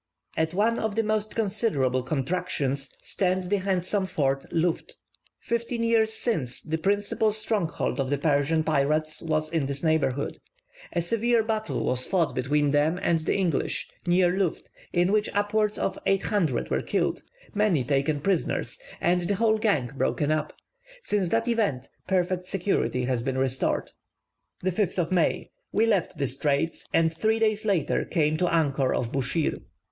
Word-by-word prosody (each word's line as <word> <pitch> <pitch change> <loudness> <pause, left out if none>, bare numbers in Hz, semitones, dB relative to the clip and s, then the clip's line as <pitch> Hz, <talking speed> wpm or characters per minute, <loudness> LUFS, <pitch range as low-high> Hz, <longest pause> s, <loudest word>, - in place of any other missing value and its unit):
At 160 +2 0
one 225 +4 +2
of 220 -2 -2
the 225 - +2
most 215 0 -1
considerable 195 - +1
contractions 135 0 -1
stands 185 -1 0
the 205 - +2
handsome 190 +1 0
fort 135 -5 -1
Luft. 165 0 -1 0.4
Fifteen 235 0 -2
years 225 -1 +3
since 180 - -1
the 160 +1 -2
principal 205 +4 +1
stronghold 205 -9 0
of 130 - -2
the 145 - +1
Persian 150 +2 +2
pirates 155 +1 0
was 155 -1 -1
in 160 -5 0
this 140 +2 -3
neighbourhood. 145 -4 0 0.5
A 170 - +1
severe 230 +5 +2
battle 220 -1 -2
was 125 0 0
fought 175 -5 +1
between 145 +3 +1
them 150 +4 +2
and 165 -1 +2
the 155 - -1
English, 180 -7 0 0.2
near 175 0 +3
Luft, 190 -4 -2 0.2
in 175 +2 +2
which 210 0 +2
upwards 210 +1 +1
of 190 - -2
800 195 - +1
were - - +1
killed, - - -1 0.3
many 205 -10 +2
taken 140 +2 0
prisoners, 185 0 -1 0.2
and 175 +1 +2
the 200 +4 0
whole 220 +1 +2
gang 160 - +1
broken 145 +2 0
up. 155 -1 0 0.5
Since 200 -4 0
that 230 +3 +1
event, 205 - 0 0.2
perfect 180 -1 0
security 180 -10 0
has 125 -2 0
been 130 +1 -2
restored. 130 0 0 0.7
5th 185 -2 0
May. 180 -3 +1 0.2
We 220 - +3
left 200 -8 0
the 140 - 0
straits, 140 +4 -1
and 160 0 +2
three 220 +5 +1
days 215 -1 +1
later 195 -7 +1
came 155 -3 +1
to 180 - +1
anchor 140 -5 +2
off 120 -1 -2
Buschir. 140 +4 0
175 Hz, 155 wpm, -26 LUFS, 145-205 Hz, 0.7 s, years